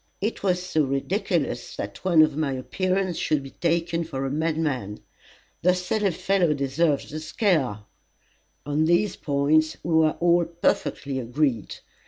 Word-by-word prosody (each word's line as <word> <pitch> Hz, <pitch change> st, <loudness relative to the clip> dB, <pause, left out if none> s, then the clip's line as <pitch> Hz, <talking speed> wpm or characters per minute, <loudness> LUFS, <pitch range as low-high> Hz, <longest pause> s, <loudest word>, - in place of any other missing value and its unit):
"It 215 Hz, +4 st, -2 dB
was 180 Hz, -2 st, +1 dB
so 160 Hz, -4 st, +1 dB
ridiculous 140 Hz, +10 st, -1 dB
that -, -, -6 dB
one 170 Hz, -4 st, +6 dB
of 155 Hz, -2 st, +1 dB
my 150 Hz, -3 st, -1 dB
appearance 185 Hz, +7 st, -1 dB
should 150 Hz, -3 st, 0 dB
be 135 Hz, -, -10 dB
taken 170 Hz, 0 st, 0 dB
for 135 Hz, -5 st, -4 dB
a 135 Hz, -, -2 dB
madman. 150 Hz, -9 st, -1 dB, 0.6 s
The 180 Hz, +1 st, +4 dB
silly 195 Hz, +3 st, 0 dB
fellow 180 Hz, -2 st, +1 dB
deserved 140 Hz, +2 st, 0 dB
the 155 Hz, -, -4 dB
scare." 155 Hz, -, 0 dB, 0.8 s
On 145 Hz, +2 st, +1 dB
these 175 Hz, +5 st, +2 dB
points 155 Hz, +2 st, +1 dB
we 170 Hz, -, -1 dB
were 160 Hz, -1 st, +4 dB
all 170 Hz, 0 st, +3 dB
perfectly 155 Hz, -4 st, -1 dB
agreed. 125 Hz, -2 st, -1 dB
155 Hz, 145 wpm, -25 LUFS, 140-175 Hz, 0.8 s, one